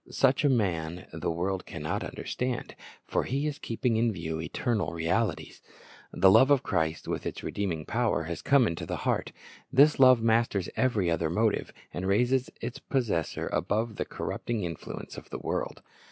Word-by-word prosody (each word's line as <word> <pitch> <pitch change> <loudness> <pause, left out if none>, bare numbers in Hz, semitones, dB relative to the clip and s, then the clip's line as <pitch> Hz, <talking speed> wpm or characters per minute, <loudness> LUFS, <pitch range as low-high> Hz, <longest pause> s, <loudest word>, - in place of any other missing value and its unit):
Such 135 +2 +2
a 145 - +5
man 90 -8 0
the - - -2
world 90 +3 -2
can 85 - -7
not 75 - -2
understand; 125 -1 -4 0.3
for - - 0
he 140 +3 -1
is 150 -1 -3
keeping 115 0 -1
in 115 0 +2
view 80 -4 -4
eternal 95 0 -1
realities. 85 +7 -1 0.5
The 95 - +5
love 115 +7 +7
of 140 -3 +4
Christ 80 0 -1
with - - -2
its - - -6
redeeming 85 -6 -2
power 115 -7 0
has 85 0 -5
come 140 -3 +4
into 85 -5 -3
the - - -2
heart. - - 0 0.4
This 145 +3 +5
love 130 -2 +8
masters 115 -4 +1
every 105 -9 +1
other 85 -1 0
motive, 110 +5 +1 0.2
and 90 +2 -3
raises 125 +6 +2
its 120 +1 -5
possessor 110 - -1
above 110 +4 0
the - - -1
corrupting 115 -4 -3
influence 85 -3 -6
of - - -10
the - - -5
world. - - -3
110 Hz, 170 wpm, -28 LUFS, 85-125 Hz, 0.5 s, love